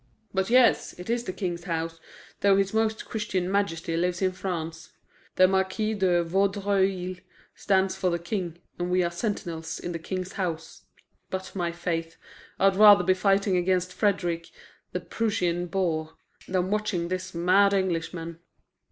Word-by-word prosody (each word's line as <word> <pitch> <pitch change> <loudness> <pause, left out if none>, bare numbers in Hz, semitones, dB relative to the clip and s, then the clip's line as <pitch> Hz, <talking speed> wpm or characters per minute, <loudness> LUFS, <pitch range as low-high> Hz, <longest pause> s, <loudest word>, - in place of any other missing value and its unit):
"But 190 +1 0
yes, 245 -1 +4
it 180 +5 -5
is 240 0 -1
the - - -2
King's 175 -3 -4
house, 165 -2 -3 0.4
though 200 -1 +4
his 195 0 +1
Most 220 0 0
Christian 195 -5 -2
Majesty 165 -5 0
lives 175 +1 0
in 190 -1 +2
France. 165 -3 -5 0.4
The 185 - +6
Marquis 190 +3 0
de 180 -4 +2
Vaudreuil 195 0 0 0.4
stands 190 -1 +1
for 185 - 0
the 170 - 0
King, 170 -1 -4 0.2
and 175 0 -1
we 180 0 +3
are 170 - -1
sentinels 170 -4 -3
in 175 - -5
the 165 - -4
King's 185 +2 -4
house. 165 -4 -4 0.4
But, 190 +1 -5
my 175 -2 -1
faith, 165 -1 -3 0.4
I'd 195 0 +3
rather 205 -2 +8
be 185 +1 +4
fighting 195 0 +2
against 180 0 +1
Frederick, 175 -5 0 0.4
the - - -3
Prussian 180 -6 -1
boar, 160 -3 -1 0.3
than 185 0 0
watching 210 -5 -1
this 185 0 -4
mad 185 +4 +4
Englishman." 170 -3 -2
185 Hz, 150 wpm, -26 LUFS, 170-195 Hz, 0.4 s, rather